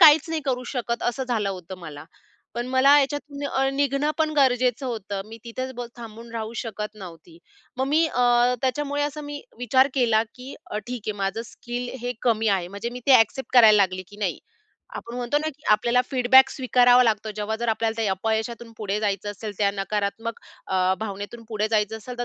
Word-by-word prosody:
काहीच 315 -1 +8
नाही 325 -1 -1
करू 255 -2 -1
शकत, 235 -3 -2
असं 260 +2 -1
झालं 225 -5 -1
होतं 185 -1 -8
मला. 155 -3 -9 0.5
पण 240 +1 -3
मला 260 +3 +5
याच्यातून 285 -1 -1
निघणं 280 +1 +1
पण 315 -1 +2
गरजेचं 255 -1 +2
होतं, 205 -5 -4
मी 225 - -10
तिथेच 255 +3 -5
ब 245 - -4
थांबून 230 0 -10
राहू 225 -1 -4
शकत 210 -2 -5
नव्हती. 170 -4 -12 0.4
मग 265 - 0
मी 315 +4 +3
अ, 245 -2 +3
त्याच्यामुळे 285 +2 0
असं 295 +1 -3
मी 290 0 -6 0.2
विचार 260 +2 +3
केला, 230 -5 +3
की 255 +2 -9 0.2
अ, 210 - -2
ठीक 245 -2 -5
आहे, 215 - 0
माझं 195 +4 -1
स्किल 245 +1 -6
हे 245 +1 -2
कमी 225 -2 +2
आहे, 185 -3 +1
म्हणजे 200 +5 -5
मी 250 - -7
ते 275 - +6
ॲक्सेप्ट 225 +4 0
करायला 220 -4 +8
लागली, 185 -2 +2
की 205 - -14
नाही, 210 - -2 0.6
आपण 235 - -7
म्हणतो 250 +4 0
ना, 310 +1 -2
की 295 - -30
आपल्याला 235 +4 +4
फीडबॅक 260 0 +6
स्वीकारावा 250 -1 +4
लागतो. 215 -1 0
जेव्हा 215 +1 -2
जर 235 - -1
आपल्याला 225 0 0
त्या 210 - +1
अपयशातून 220 +4 -2
पुढे 205 -1 -2
जायचं 205 -1 -1
असेल, 205 +1 -6
त्या 200 -1 +3
नकारात्मक 205 +3 -3 0.3
अ, 185 0 +2
भावनेतून 205 +2 -6
पुढे 215 -1 -1
जायचं 215 0 +1
असेल, 245 +3 -9
तर 245 - -1
235 Hz, 190 wpm, -24 LUFS, 210-260 Hz, 0.6 s, काहीच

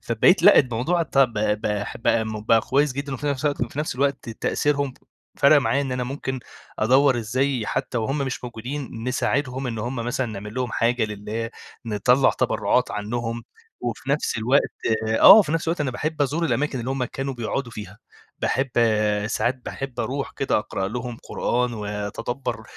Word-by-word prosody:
فبقيت 120 - +3
لأ، 205 - +8
الموضوع 130 +7 +1
طب 135 -6 +2
ب 105 -1 0 0.4
ب 110 -2 0
بقى 115 -1 +6
كويس 140 +3 +1
جدًا، 140 +1 -4
وفي 145 +3 -5
نفس 140 +1 -2
الوقت 145 -4 0
في 145 - -8
نفس 155 - -1
الوقت 140 -1 -1
تأثيرهم 140 +4 -1 0.4
فرق 145 +2 +6
معايا 140 0 +1
إن 135 -2 -3
أنا 125 -1 -2
ممكن 130 -1 -4 0.4
أدوّر 130 +3 +4
إزاي 125 +1 -1
حتى 120 - -2
وهم 135 +6 -1
مش 130 -2 -3
موجودين 120 0 -6
نساعدهم، 130 +1 -1
إن 115 -2 -3
هم 125 +4 -3
مثلًا 120 +2 -1
نعمل 105 0 -7
لهم 125 -2 -2
حاجة 120 0 +1
لله، 105 +2 -4 0.4
نطَّلع 125 +5 +3
تبرعات - - +1
عنهم، 115 +2 -3 0.4
وفي 120 +3 -4
نفس 140 -4 0
الوقت 125 +6 +2 0.5
آه، - - +11
وفي 205 -8 +6
نفس 165 0 -1
الوقت 165 -2 -1
أنا 135 -3 0
باحب 150 +4 -2
أزور 155 +5 0
الأماكن 145 -5 0
اللي 125 +3 -4
هم 135 -2 -1
كانوا 135 +2 -4
بيقعدوا 120 +1 -3
فيها، 105 -1 -9 0.4
باحب 135 0 0 0.6
ساعات 120 +3 -1
باحب 135 -3 -5
أروح 135 +5 -3
كده 135 - +1
أقرأ 95 -2 -3
لهم 125 +1 -5
قرآن 125 0 -1
وأتدبَّر 105 +5 -4
125 Hz, 165 wpm, -23 LUFS, 115-140 Hz, 0.6 s, آه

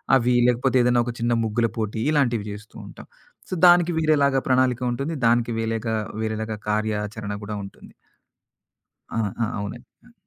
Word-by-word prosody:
అవి, 125 -1 +2
లేకపోతే 125 +2 +2
ఏదైనా 120 0 +3
ఒక 120 - -4
చిన్న 120 +1 +1
ముగ్గుల 115 +2 +1
పోటీ, 110 0 -2
ఇలాంటివి 120 -8 +1
చేస్తూ 105 +1 -11
ఉంటాం. - - -12 0.4
సో, - - -4
దానికి 175 0 +5
వేరేలాగా 140 -4 +3
ప్రణాళిక 130 -1 +2
ఉంటుంది. 140 +7 -3
దానికి 120 0 +2
వేలేగా 115 0 -2 0.3
వేరేలాగా 110 0 -3
కార్యాచరణ 105 -1 -2
కూడా 105 0 -5
ఉంటుంది. 100 - -14 1.2
ఆ! - - -3 0.3
ఆ! - - +2
అవునండి. 115 +5 -6 0.2
ఆ! 245 - -20
115 Hz, 145 wpm, -23 LUFS, 110-130 Hz, 1.2 s, దానికి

